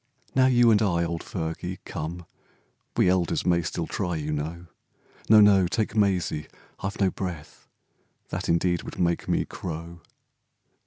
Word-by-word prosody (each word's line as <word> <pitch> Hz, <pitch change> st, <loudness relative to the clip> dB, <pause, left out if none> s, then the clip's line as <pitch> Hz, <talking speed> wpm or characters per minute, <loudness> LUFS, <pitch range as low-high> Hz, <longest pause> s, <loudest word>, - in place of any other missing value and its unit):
Now 130 Hz, -1 st, +5 dB
you 120 Hz, -2 st, +5 dB
and 105 Hz, -1 st, +4 dB
I, 85 Hz, -5 st, +2 dB
old 85 Hz, 0 st, -3 dB
Fergie, 90 Hz, +1 st, -4 dB
come, 85 Hz, +3 st, -5 dB, 0.7 s
We -, -, +4 dB
elders 90 Hz, -2 st, +1 dB
may 85 Hz, -1 st, +3 dB
still 85 Hz, +1 st, -3 dB
try, 90 Hz, 0 st, -2 dB
you 75 Hz, -1 st, -3 dB
know, 80 Hz, +4 st, -4 dB, 0.6 s
No, 110 Hz, -1 st, +8 dB
no! 100 Hz, -3 st, +6 dB
take 110 Hz, +3 st, -1 dB
Mysie, 95 Hz, -7 st, +1 dB, 0.3 s
I've 100 Hz, +1 st, -4 dB
no 95 Hz, -2 st, +3 dB
breath, 85 Hz, -5 st, -7 dB, 0.6 s
That -, -, -4 dB
indeed 85 Hz, +1 st, +2 dB
would -, -, -9 dB
make 85 Hz, -1 st, 0 dB
me -, -, +1 dB
crow 85 Hz, 0 st, -7 dB
90 Hz, 150 wpm, -26 LUFS, 85-100 Hz, 0.7 s, No